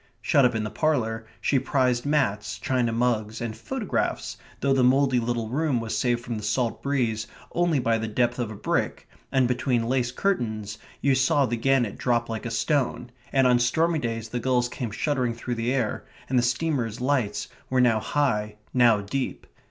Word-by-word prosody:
Shut 140 -4 +3
up 125 - +2
in 110 - 0
the 105 - -4
parlour 115 -8 0
she 135 - +2
prized 130 -1 +1
mats, 115 -9 0
china 125 -3 0
mugs, 115 -2 0
and 115 -2 -4
photographs, 260 -7 -2 0.2
though 140 -1 +2
the 130 -1 +3
mouldy 130 0 +4
little 115 -1 -2
room 140 -1 +1
was 115 -1 -3
saved 120 -2 +1
from 120 -2 -3
the 105 - -6
salt 115 +2 -1
breeze 120 -6 -1 0.2
only 175 -3 +2
by 115 -3 +1
the 110 - -3
depth 120 +3 0
of 120 -3 -1
a 110 - -7
brick, - - -2 0.2
and 130 -2 +3
between 125 -1 +1
lace 125 -1 +1
curtains 110 - -2 0.2
you 140 0 +3
saw 130 +2 +3
the 120 - -1
gannet 120 -2 +1
drop 120 -2 +1
like 115 +1 -4
a - - -3
stone, 125 -2 0 0.2
and 135 -1 +3
on 125 -1 +5
stormy 160 +7 +2
days 115 -3 -3
the 120 - -2
gulls 125 0 +1
came 125 -2 -4
shuddering 125 +1 -1
through 120 +1 -4
the 115 +1 -1
air, 130 -5 -1 0.2
and 130 -1 +2
the - - +3
steamers' 125 -2 -1
lights 125 -5 0 0.2
were 130 - +2
now 120 -3 +4
high, 105 -6 0 0.2
now 120 -4 +5
deep. 130 +7 -3
125 Hz, 190 wpm, -25 LUFS, 115-135 Hz, 0.2 s, on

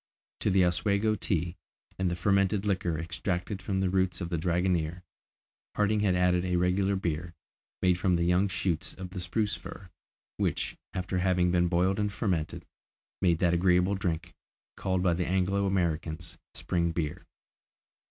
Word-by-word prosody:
To - - +1
the 95 -1 +4
Oswego 100 +5 +2
tea, 90 -4 -1 0.4
and 95 -1 +1
the 85 - -1
fermented 100 +2 +2
liquor 95 -5 0
extracted 90 +3 -3
from 95 0 -1
the 95 - +1
roots 95 -2 +1
of 85 -3 -4
the 85 - -1
dragonnier, 90 0 0 0.7
Harding 105 +1 +2
had 100 -3 +2
added 90 0 +3
a 90 -1 0
regular 95 +3 +2
beer, 85 -2 -3 0.5
made 90 -1 +3
from 90 -1 +2
the 85 - +1
young 90 +3 +3
shoots 95 -3 -2
of 90 -1 -8
the 95 - -5
spruce 105 +4 -1
fir, 95 -3 -10 0.5
which, - - -1 0.2
after 90 0 -1
having 90 -1 +2
been 90 0 +3
boiled 95 +3 +2
and 105 -1 0
fermented, 90 -7 -2 0.6
made 85 -3 +3
that 85 -2 +3
agreeable 90 +2 +3
drink, 90 -3 -2 0.4
called 95 -1 -1
by 90 -2 +3
the 90 +1 -1
Anglo 95 +2 +1
Americans 85 -3 -2 0.2
spring 85 -2 0
beer. 80 -3 -3
90 Hz, 160 wpm, -29 LUFS, 85-95 Hz, 0.7 s, the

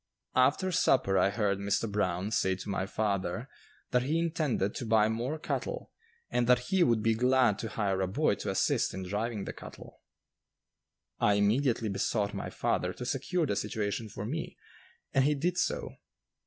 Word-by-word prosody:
After 140 +9 +3
supper 130 - +3
I 95 - +4
heard 100 -1 0
Mr. 100 +3 0
Brown 100 -1 -1
say 95 -4 +1
to 95 - -8
my 95 -1 -1
father 100 +2 -1 0.4
that 125 - +3
he 145 +6 0
intended 155 - 0
to 125 - -5
buy 110 -1 +4
more 120 +7 -2
cattle, - - -4 0.4
and 120 -1 +1
that 125 0 +3
he 190 - +4
would 115 -8 +3
be 115 0 +3
glad 125 -2 +3
to 115 - -4
hire 100 -3 -1
a 95 - +1
boy 95 - +2
to - - -4
assist - - +1
in 95 - -4
driving 105 +3 -2
the - - -5
cattle. - - -12 1.2
I 105 - +4
immediately 115 +3 +2
besought 100 +1 -1
my - - -4
father - - -1
to 125 - -7
secure 150 +7 0
the 100 - -1
situation 105 +1 -2
for 100 - -6
me, 155 +8 -4 0.6
and 135 - +4
he 150 +2 +3
did 175 +5 0
so. - - -1
110 Hz, 175 wpm, -30 LUFS, 100-130 Hz, 1.2 s, I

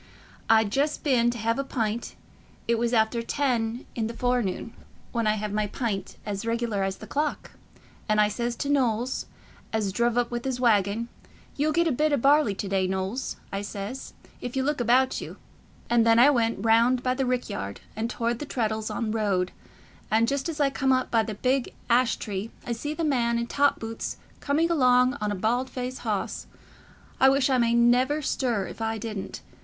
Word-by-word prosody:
I'd 220 -2 +4
just 290 +5 0
been 245 -5 +3
t' 240 - -3
hev 230 +3 0
a - - +1
pint—it 230 -1 -4
was 235 0 +1
half 225 -2 +4
after 235 0 -3
ten 240 -2 -1
i' 235 - -2
the 225 +1 -2
fore 245 +1 +1
noon, 200 +2 -4 0.4
when 230 -2 0
I 215 - +4
hev 210 -1 -3
my 210 0 0
pint 205 -4 -3
as 205 -1 -3
reg'lar 230 -3 -1
as 195 0 -1
the - - -10
clock—and 280 -6 -4
I 210 - +5
says 235 +3 -2
to 280 - -3
Knowles, 250 -3 0 0.4
as 210 -4 -1
druv 235 +2 +1
up 245 -1 +1
with 240 0 -3
his 260 -2 -2
waggon, 220 -1 +2 0.5
'You'll 300 +2 +1
get 340 +2 +2
a - - +2
bit 300 +4 +1
o' 285 - +3
barley 275 -4 +4
to 200 - -4
day, 190 -1 +1
Knowles,' 190 +7 -2 0.2
I 195 - -1
says, 205 +5 -6 0.3
'if 245 +1 -5
you 265 - +1
look 290 -1 0
about 255 +2 +3
you'; - - -8 0.5
and 235 -1 +4
then 230 0 +5
I 260 +5 +7
went 230 -4 0
round 235 +3 +4
by 255 - +2
the 260 0 -1
rick 250 0 0
yard, 100 0 -5
and 220 +2 -2
towart 235 -1 -1
the 295 - -5
Treddles'on 220 -2 -2
road, 200 -5 0 0.6
and 225 +1 +3
just 280 +4 -1
as 320 -2 -5
I 280 -2 +3
come 270 -1 +1
up 255 0 +1
by 230 - +4
the 215 -1 -4
big 255 +4 0 0.2
ash 245 0 +4
tree, 205 +1 -5 0.2
I 240 - -4
see 290 +6 -3
the 330 - -2
man 240 -6 +1
i' 235 - 0
top 280 +4 +2
boots 225 0 -5 0.2
coming 315 +4 +1
along 255 -3 +4
on 210 0 0
a - - -1
bald 240 +6 0
faced 255 0 -5
hoss—I 265 - -2
wish 270 0 +2
I 255 - +3
may 235 0 +3
never 250 +5 +3
stir 235 -8 0
if - - -9
I 225 0 -1
didn't. 205 - -6
235 Hz, 200 wpm, -26 LUFS, 220-260 Hz, 0.6 s, I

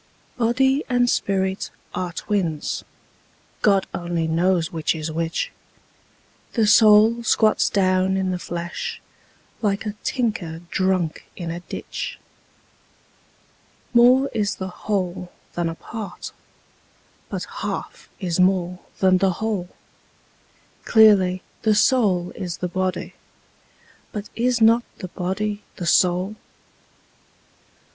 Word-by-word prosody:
Body 265 +4 +2
and 245 -1 +3
spirit 190 -4 0 0.2
are 180 -1 -3
twins: 170 -5 -2 0.8
God 195 -2 +4
only 170 -2 -2
knows 170 +1 +1
which 160 0 -1
is 160 0 -4
which: 165 +1 -2 1.0
The 225 -3 +3
soul 215 +2 +6
squats 220 -1 +3
down 185 -1 +2
in 190 -1 0
the 180 - -2
flesh, 170 0 -5 0.6
like 205 -1 0
a 210 - -2
tinker 205 -10 -2
drunk 185 -4 0
in 170 -2 -5
a 170 - -4
ditch. 175 - -6 1.8
More 250 +3 +6
is 205 -3 0
the 190 0 -5
whole 180 -2 -3 0.2
than 175 -1 -1
a 165 - -5
part: 220 +3 -7 1.0
but - - -3 0.2
half - - -5
is 180 -4 -2
more 180 -1 +2 0.2
than 185 -1 +4
the 190 -1 +2
whole: 205 -3 -2 1.1
Clearly, 195 -5 +5 0.2
the 215 -2 +3
soul 205 -7 +3
is 175 -3 -5
the 180 - -2
body: 185 +1 -2 1.0
but 210 -1 -6
is 245 0 +1
not 230 +2 +6
the 185 - -7
body 205 +4 -3
the 175 - -5
soul? 180 +4 +2
190 Hz, 110 wpm, -22 LUFS, 175-215 Hz, 1.8 s, soul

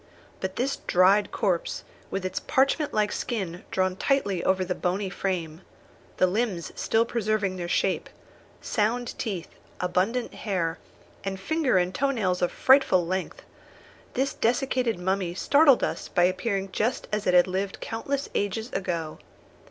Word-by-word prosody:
But 190 0 -4
this 270 +3 -1
dried 195 +3 +4
corpse, 185 -6 -1 0.3
with 195 -1 -3
its 185 - -2
parchment 275 +3 +1
like 210 -1 +1
skin 185 -7 -3
drawn 185 -1 0
tightly 200 -7 0
over 190 0 +2
the 180 - -1
bony 185 +2 -2
frame, 175 -4 -3 0.6
the - - +5
limbs 190 -2 -1
still 225 +1 +2
preserving 215 -4 0
their 175 -1 -4
shape, - - 0 0.5
sound 235 +3 0
teeth, 195 -7 -3 0.3
abundant 190 +7 0
hair, 175 -5 -2 0.4
and 195 -1 -3
finger 300 - +1
and 180 0 +1
toe 275 +8 +1
nails 190 -9 0
of 175 - +2
frightful 260 -10 +4
length, 185 +2 -3 0.7
this 270 +2 0
desiccated 245 -2 +1
mummy 180 -1 -1
startled 280 +5 +5
us - - -2
by 175 - +2
appearing 195 +1 0
just 225 +6 -1
as 210 0 -1
it 180 - +4
had 175 - +7
lived 190 +1 -3
countless 275 +5 -3
ages 220 +4 -2
ago. 170 -5 -3
195 Hz, 145 wpm, -26 LUFS, 180-235 Hz, 0.7 s, had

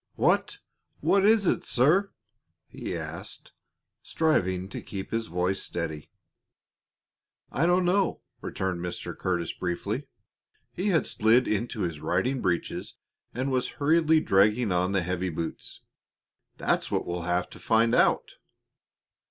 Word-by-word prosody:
"Wha - - +4 0.6
what 200 -1 +3
is 215 0 +5
it, - - +1
sir?" 170 +11 +3 0.6
he - - -5
asked, - - -8 0.5
striving 95 - 0
to - - -6
keep 95 -1 -7
his 115 0 -1
voice 90 +2 -1
steady. 80 -3 -5 1.4
"I 165 - +1
don't 180 +1 +3
know," 190 +1 +1 0.2
returned 95 -2 -3
Mr. 90 - -5
Curtis, 90 -2 -2
briefly. 100 +9 -3 0.7
He 185 - -2
had 175 -6 +3
slid 115 +4 +3
into 110 +1 -1
his 85 -5 -2
riding 95 +12 0
breeches 90 -3 -2 0.4
and 130 +2 -1
was 130 -1 0
hurriedly 160 +1 +4
dragging 105 0 +3
on 90 +1 +1
the 95 -2 +1
heavy 90 +1 -2
boots. 80 0 -6 0.8
"That's - - 0
what - - -1
we'll 85 0 -3
have 90 0 +1
to - - -11
find 115 +1 +2
out." - - +2
105 Hz, 130 wpm, -27 LUFS, 90-150 Hz, 1.4 s, is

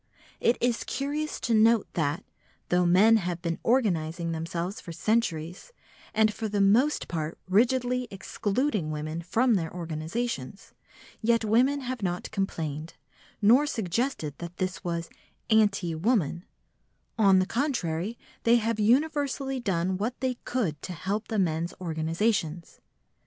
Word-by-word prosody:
It 235 - +3
is 240 -1 +1
curious 295 +3 -3
to 235 - 0
note 225 0 +5
that, 155 -2 -1 0.5
though 180 0 +3
men 210 +6 +6
have 180 -4 -2
been 170 -1 -2
organising 170 -9 +1
themselves 170 +4 -3
for 170 - -8
centuries, 175 - -1 0.4
and 215 -1 +3
for 220 0 -4
the 205 0 -1
most 230 +10 +3
part 160 -1 -3
rigidly 250 +5 +2
excluding 205 - -1
women 155 +2 -4
from 230 +8 +2
their 165 -6 0
organisations, 170 - -4 0.5
yet 230 0 +2
women 255 +6 +3
have 255 -2 -4
not 180 -2 -3
complained, 160 -6 -3 0.5
nor 250 +8 +6
suggested 220 - -1
that 170 0 -7
this 185 0 -3
was 170 -1 -2 0.4
"anti 205 -6 +3
woman"; 170 - 0 0.7
on 195 -3 +6
the 185 - +3
contrary, 225 - -1 0.2
they 235 +1 +5
have 230 -1 0
universally 270 +3 +1
done 185 -4 0
what 230 +5 -2
they 260 -1 0
could 190 - -1
to 185 - -5
help 200 +5 -3
the 220 - -2
men's 170 -2 0
organisations. 165 +1 -1
200 Hz, 135 wpm, -27 LUFS, 170-235 Hz, 0.7 s, men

